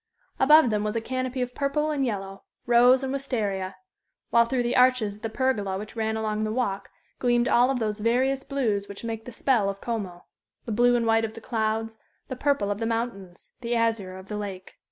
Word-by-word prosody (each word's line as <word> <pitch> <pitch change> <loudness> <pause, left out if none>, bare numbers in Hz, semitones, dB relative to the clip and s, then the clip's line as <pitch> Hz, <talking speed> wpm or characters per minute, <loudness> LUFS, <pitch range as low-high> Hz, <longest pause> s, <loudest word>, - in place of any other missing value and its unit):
Above 300 -3 +6
them 210 -1 0
was 210 +1 -2
a - - +2
canopy 255 +2 -2
of 250 0 -6
purple 300 +3 0
and 285 -2 0
yellow 195 -3 -4 0.3
rose 245 +2 +5
and 265 0 -2
wistaria; 205 -9 -2 0.6
while 235 0 +5
through 245 +1 0
the 240 - -1
arches 250 -5 +4
of 210 - -16
the 225 - -3
pergola 220 -6 -1
which 210 +3 -8
ran 220 -1 -1
along 215 -1 -1
the 215 - -1
walk 205 -5 -2 0.3
gleamed 240 -1 +2
all 245 +2 +4
those 215 -3 -2
various 260 +5 +1
blues 220 -8 -1
which 200 +2 -8
make 225 -1 -5
the 245 - -8
spell 230 -4 +1
of 195 0 -5
Como 195 -7 -5 0.4
the 230 - -4
blue 245 +3 +4
and 235 -1 +1
white 225 0 +3
of 220 0 -4
the - - -7
clouds, 225 -1 -2 0.3
the 260 - -3
purple 265 -6 0
of 205 - -3
the 225 - -1
mountains, 225 -6 -4
the 240 0 -1
azure 225 -5 0
of 190 +1 -12
the 210 - -4
lake. 195 -3 -7
225 Hz, 210 wpm, -26 LUFS, 210-250 Hz, 0.6 s, Above